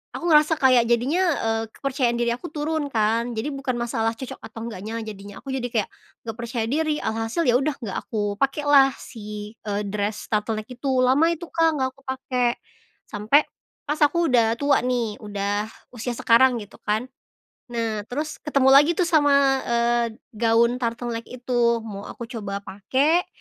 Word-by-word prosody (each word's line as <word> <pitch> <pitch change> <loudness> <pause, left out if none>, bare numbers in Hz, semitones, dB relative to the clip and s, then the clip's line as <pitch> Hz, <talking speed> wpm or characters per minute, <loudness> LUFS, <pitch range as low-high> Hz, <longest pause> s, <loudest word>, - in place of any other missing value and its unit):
aku - - -6
ngerasa 305 +1 +5
kayak 255 -3 +4
jadinya, 260 +10 +2 0.2
eee, 225 0 0
kepercayaan 260 -3 0
diri 235 0 +1
aku 250 +8 -6
turun 300 -1 -2
kan, 230 +1 +1
jadi 280 +6 -2
bukan 270 -2 -2
masalah 225 -1 -1
cocok 260 - -7
atau 225 - -10
enggaknya 220 0 -6
jadinya, 205 -1 -9
aku 270 -1 -5
jadi 250 -2 -2
kayak 220 -4 -1 0.4
nggak 225 0 -5
percaya 235 -1 -2
diri, 305 +4 0
alhasil 225 +9 -1
ya 240 - +4
udah, 285 0 -1
nggak 220 -8 -5
aku 205 -2 -1
pakai 275 +2 0
lah 275 -2 +7
si, 210 -2 -8
eee, 205 0 -1
dress 205 +1 -3
turtleneck 215 0 -1
itu, 250 +3 -6 0.2
lama 285 +6 +4
itu 340 0 -3
Kak, 330 0 +3
nggak 260 -1 0
aku 275 - -23
pake. 255 -2 -1 0.5
Sampai 220 +8 +3 0.4
pas 300 +1 -2
aku 325 0 +3
udah 230 -2 +4
tua 285 0 +3
nih, 240 -4 -1
udah 205 0 -2 0.3
usia 240 +1 -4
sekarang 245 +2 +5
gitu 205 - -16
kan. 215 +3 -1 0.7
Nah, 225 -3 -2
terus 300 +4 -3
ketemu 275 -3 +2
lagi 295 +4 +7
tuh 355 - +3
sama 295 -4 +4 0.3
eee, 235 0 +2 0.3
gaun 230 +2 +3
turtleneck 235 -1 -3
itu, 240 -2 0
mau 205 -2 -7
aku - - -8
coba 200 -3 -5
pake 275 - +1
240 Hz, 170 wpm, -24 LUFS, 220-275 Hz, 0.7 s, lah